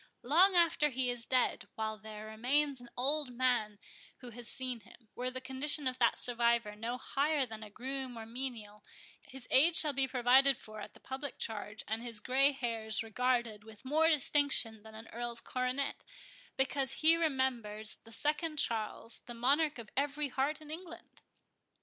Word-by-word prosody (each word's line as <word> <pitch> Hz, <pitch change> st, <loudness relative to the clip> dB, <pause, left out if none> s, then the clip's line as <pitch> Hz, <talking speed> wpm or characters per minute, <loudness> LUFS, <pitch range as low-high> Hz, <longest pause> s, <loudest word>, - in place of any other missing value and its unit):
Long 360 Hz, +9 st, +5 dB
after 330 Hz, -3 st, +4 dB
he 255 Hz, -1 st, -1 dB
is 240 Hz, -1 st, -4 dB
dead, 255 Hz, -1 st, +1 dB
while 220 Hz, 0 st, -2 dB
there 215 Hz, 0 st, -9 dB
remains 260 Hz, +5 st, 0 dB
an 240 Hz, -, -13 dB
old 285 Hz, +2 st, 0 dB
man 240 Hz, -4 st, 0 dB, 0.4 s
who 245 Hz, -2 st, -11 dB
has 240 Hz, +1 st, -6 dB
seen 255 Hz, -2 st, -1 dB
him, 225 Hz, +1 st, -19 dB
were 250 Hz, +1 st, -3 dB
the 255 Hz, 0 st, -6 dB
condition 265 Hz, +3 st, +3 dB
of 255 Hz, 0 st, -2 dB
that 235 Hz, -2 st, +3 dB
survivor 235 Hz, -3 st, +1 dB
no 230 Hz, +3 st, -4 dB
higher 280 Hz, +2 st, 0 dB
than 220 Hz, -2 st, -9 dB
a 215 Hz, -, -8 dB
groom 260 Hz, +2 st, -5 dB
or 225 Hz, -, -6 dB
a -, -, -10 dB
menial, 225 Hz, -3 st, -5 dB, 0.4 s
his 265 Hz, -1 st, -11 dB
age 320 Hz, +6 st, +5 dB
shall 300 Hz, -2 st, +4 dB
be 270 Hz, 0 st, +1 dB
provided 260 Hz, +1 st, +4 dB
for 215 Hz, -1 st, -10 dB
at -, -, -10 dB
the -, -, -15 dB
public 270 Hz, +1 st, -6 dB
charge, 210 Hz, -1 st, -5 dB
and 220 Hz, +2 st, -2 dB
his 235 Hz, -3 st, -3 dB
grey 270 Hz, +5 st, +3 dB
hairs 225 Hz, -5 st, -1 dB
regarded 235 Hz, -1 st, -1 dB
with 220 Hz, +2 st, -15 dB
more 310 Hz, +4 st, +3 dB
distinction 285 Hz, -7 st, +2 dB
than 220 Hz, +1 st, -13 dB
an 220 Hz, +1 st, -10 dB
earl's 235 Hz, 0 st, -4 dB
coronet, 255 Hz, +3 st, -3 dB, 0.5 s
because 265 Hz, 0 st, +1 dB
he 320 Hz, +1 st, +7 dB
remembers 255 Hz, -9 st, -1 dB
the 225 Hz, -, -17 dB
Second 300 Hz, +6 st, -1 dB
Charles, 225 Hz, -2 st, -1 dB
the 240 Hz, -, -7 dB
monarch 285 Hz, +6 st, +2 dB
of 230 Hz, -3 st, -9 dB
every 285 Hz, +1 st, -1 dB
heart 280 Hz, +4 st, -1 dB
in 305 Hz, 0 st, -11 dB
England!" 340 Hz, +1 st, -10 dB
250 Hz, 175 wpm, -33 LUFS, 225-280 Hz, 0.5 s, he